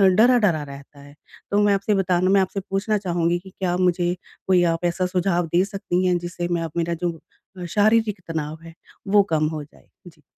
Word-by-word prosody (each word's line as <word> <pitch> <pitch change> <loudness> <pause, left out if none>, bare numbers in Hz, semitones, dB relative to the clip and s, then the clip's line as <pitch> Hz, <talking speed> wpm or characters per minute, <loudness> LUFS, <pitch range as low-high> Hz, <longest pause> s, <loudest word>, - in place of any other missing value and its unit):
डरा-डरा 215 -9 +4
रहता 140 0 -12
है। 145 0 -14 0.4
तो 205 - +3
मैं 205 -1 +4
आपसे 200 +2 0
बताना 185 -1 +1
मैं 195 0 +5
आपसे 190 +1 -2
पूछना 205 +2 0
चाहूँगी 175 -3 0
कि 190 +1 -14
क्या 185 -2 -2
मुझे 180 -1 +1 0.3
कोई 180 -2 +4
आप 165 +1 -4
ऐसा 180 +2 0
सुझाव 180 -1 0
दे 180 +2 +4
सकती 185 -2 -2
हैं 180 -1 +2
जिससे 175 0 -4
मैं 170 - 0
अ 165 - -4
मेरा 170 0 0
जो 170 -2 -2 0.5
शारीरिक 210 0 +2
तनाव 155 -1 -4
है 165 0 -11 0.3
वो 200 0 +5
कम 155 -1 +1
हो 155 -1 -4
जाए? 145 - -21 0.2
जी। 160 -3 -16
175 Hz, 195 wpm, -22 LUFS, 165-195 Hz, 0.5 s, मैं